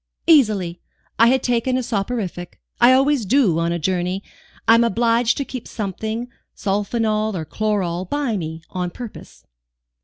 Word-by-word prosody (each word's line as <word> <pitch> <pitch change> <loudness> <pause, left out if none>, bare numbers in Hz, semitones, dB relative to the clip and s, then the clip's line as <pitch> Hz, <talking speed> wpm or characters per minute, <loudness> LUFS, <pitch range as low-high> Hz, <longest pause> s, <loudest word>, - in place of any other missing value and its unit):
"Easily: 210 - +3 0.4
I 230 - +7
had 260 +1 +3
taken 245 +1 +1
a 255 - -1
soporific. 195 -6 -3 0.2
I 240 +1 +7
always 270 0 +3
do, 205 - +3
on 170 0 0
a 170 - 0
journey. 180 +3 -1 0.4
I 225 - +8
am 230 +1 +5
obliged 230 +1 +2
to 280 - -2
keep 255 -3 -7
something, 220 +3 -4 0.3
sulphonal 215 +1 -1
or 160 -3 -4
chloral, 185 -2 -1
by 280 0 -1
me, 160 -3 -5
on 180 -1 -2
purpose." 230 +4 -10
215 Hz, 150 wpm, -21 LUFS, 185-240 Hz, 0.4 s, I